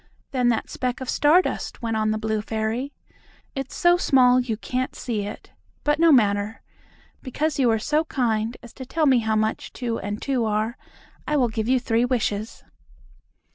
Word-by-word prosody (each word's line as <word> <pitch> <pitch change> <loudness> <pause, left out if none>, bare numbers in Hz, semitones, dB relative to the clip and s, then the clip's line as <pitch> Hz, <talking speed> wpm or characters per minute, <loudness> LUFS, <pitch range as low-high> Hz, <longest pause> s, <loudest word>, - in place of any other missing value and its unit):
"Than 250 -2 +1
that 230 -2 0
speck 250 -1 -3
of 260 - -3
star 320 +5 +5
dust," - - -5
went 225 -1 -1
on 215 0 +1
the 215 - 0
blue 220 -1 -1
fairy. 220 +5 -2 0.6
"It's 270 -1 -5
so 350 0 +4
small 255 -6 +4
you 240 -4 -2
can't 255 +3 -3
see 215 -5 -3
it. 210 - -9 0.3
But 295 +1 +1
no 335 0 +6
matter. 210 -4 +2 0.6
Because 290 +3 -2
you 260 - +4
were 225 -1 +3
so 300 +8 0
kind 230 -5 -1
as 240 - -12
to 260 - -8
tell 320 +3 0
me 265 -4 +5
how 220 -1 0
much 215 0 -1
two 235 -3 -3
and 205 +2 -4
two 265 -4 -1
are, 215 +2 -1 0.5
I 300 - +1
will 250 -4 +2
give 220 0 -3
you 260 0 +4
three 230 -1 +1
wishes." 225 -4 -2
240 Hz, 185 wpm, -24 LUFS, 220-265 Hz, 0.6 s, no